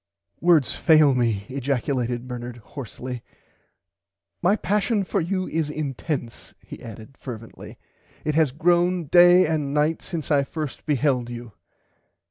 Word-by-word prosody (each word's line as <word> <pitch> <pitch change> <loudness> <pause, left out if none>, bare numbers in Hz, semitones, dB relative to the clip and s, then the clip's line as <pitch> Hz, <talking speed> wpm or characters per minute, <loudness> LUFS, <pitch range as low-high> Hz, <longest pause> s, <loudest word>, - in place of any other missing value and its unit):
Words 165 -6 +4
fail 155 -4 +5
me 115 -5 0
ejaculated 130 -2 -2
Bernard 120 -1 -6
horsly 125 +1 -8 1.2
my 185 +4 +4
passion 210 +1 0
for 195 0 -1
you 185 +2 -2
is 160 -1 -1
intense 145 -4 -5
he - - -11
added 115 +2 -10
fervently. 115 -3 -9 0.5
It 150 - 0
has 155 -3 +3
grown 175 +3 +2
day 175 +3 +7
and 150 -3 -1
night 150 +2 +1
since 160 -3 -5
I 140 -1 +4
first 150 0 -6
beheld 135 -4 +1
you. 120 -1 -8
145 Hz, 125 wpm, -24 LUFS, 125-165 Hz, 1.2 s, day